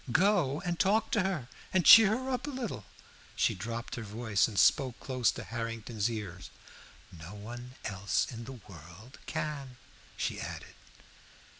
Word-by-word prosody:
Go 175 - +3
and 175 -2 -3
talk 210 +3 +2
to 210 - +3
her, 185 -10 -2 0.2
and 185 -2 +2
cheer 220 0 +9
her 260 +1 -4
up 255 +3 -2
a - - -2
little." 240 - -5 0.5
She - - +2
dropped 115 +1 -5
her - - -4
voice, 110 -1 0
and 110 -4 -8
spoke 130 -1 +3
close 130 -3 +1
to - - -7
Harrington's 115 -1 -3
ear 105 -6 -5 0.7
"No 85 +4 -10
one 120 +4 -9
else 100 -1 0
in 115 -1 -7
the 135 - -7
world 90 - -13
can," 150 -5 -4 0.4
she - - -2
added. - - -7
120 Hz, 155 wpm, -31 LUFS, 110-175 Hz, 0.7 s, cheer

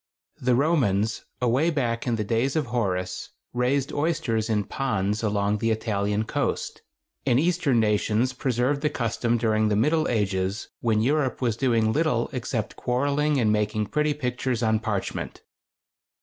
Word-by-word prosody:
] - - -36
The 125 - +5
Romans, 115 - +1
away 125 +7 +2
back 120 -7 -1
in 120 - +2
the 110 - -1
days 115 +7 0
of 155 -3 +1
Horace, 95 -7 -2 0.2
raised 130 +3 0
oysters 120 -8 0
in 105 -2 +1
ponds 105 -5 -1
along 105 -1 0
the 115 +1 0
Italian 105 -1 0
coast, - - -2 0.4
and 125 -2 +3
Eastern 165 -6 +2
nations 110 +3 +1
preserved 125 +2 0
the 150 - +2
custom 120 -2 0
during 110 -2 +2
the 105 - +1
middle 155 +9 +2
ages, 100 -2 -1
when 110 -2 +1
Europe 135 -1 +1
was 120 -4 0
doing 115 -3 +2
little 150 -6 +1
except 120 -3 -3
quarreling 140 +3 +1
and 110 -3 +3
making 105 0 0
pretty 150 +6 0
pictures 125 -3 -2
on 110 -1 +2
parchment. 105 -3 -4
120 Hz, 150 wpm, -25 LUFS, 110-135 Hz, 0.4 s, The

